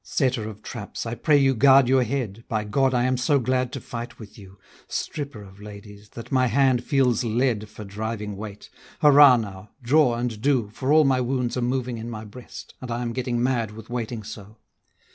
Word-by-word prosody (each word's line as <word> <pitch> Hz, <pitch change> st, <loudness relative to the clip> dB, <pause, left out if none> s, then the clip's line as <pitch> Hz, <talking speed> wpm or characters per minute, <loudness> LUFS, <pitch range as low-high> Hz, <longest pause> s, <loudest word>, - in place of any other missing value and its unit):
Setter 125 Hz, -6 st, -1 dB
of 105 Hz, 0 st, -12 dB
traps, 105 Hz, -2 st, -7 dB
I 115 Hz, -, -4 dB
pray 150 Hz, +4 st, +3 dB
you 135 Hz, -1 st, +3 dB
guard 135 Hz, +2 st, +6 dB
your 130 Hz, +1 st, +4 dB
head, 115 Hz, -4 st, -3 dB
By 110 Hz, -2 st, -1 dB
God 130 Hz, +5 st, +1 dB
I 125 Hz, -1 st, +1 dB
am 130 Hz, 0 st, +1 dB
so 140 Hz, +4 st, +2 dB
glad 130 Hz, 0 st, 0 dB
to 135 Hz, -, -4 dB
fight 120 Hz, 0 st, -7 dB
with 110 Hz, -3 st, -12 dB
you, 95 Hz, -2 st, -14 dB, 0.3 s
Stripper 140 Hz, -8 st, -5 dB
of 95 Hz, +1 st, -15 dB
ladies, 105 Hz, 0 st, -12 dB
that 115 Hz, -, -9 dB
my 130 Hz, -1 st, +3 dB
hand 130 Hz, 0 st, +2 dB
feels 125 Hz, -3 st, +1 dB
lead 115 Hz, -2 st, 0 dB
For 105 Hz, -, -10 dB
driving 105 Hz, +1 st, -5 dB
weight; 105 Hz, 0 st, -9 dB, 0.3 s
hurrah 145 Hz, -3 st, +8 dB
now! 100 Hz, -2 st, -7 dB
draw 130 Hz, -1 st, +3 dB
and 120 Hz, -3 st, -3 dB
do, 125 Hz, -6 st, +1 dB
For 130 Hz, +4 st, -2 dB
all 155 Hz, 0 st, +6 dB
my 130 Hz, -2 st, +2 dB
wounds 125 Hz, -1 st, -1 dB
are 125 Hz, -, -1 dB
moving 125 Hz, -1 st, -2 dB
in 115 Hz, +1 st, -6 dB
my 110 Hz, -2 st, -7 dB
breast, 120 Hz, +4 st, -11 dB
And 130 Hz, -, -7 dB
I 120 Hz, +1 st, -2 dB
am 120 Hz, -1 st, -3 dB
getting 125 Hz, -1 st, -2 dB
mad 120 Hz, -5 st, 0 dB
with 110 Hz, +1 st, -11 dB
waiting 120 Hz, -2 st, -4 dB
so. 105 Hz, +1 st, -10 dB
120 Hz, 205 wpm, -24 LUFS, 110-130 Hz, 0.3 s, hurrah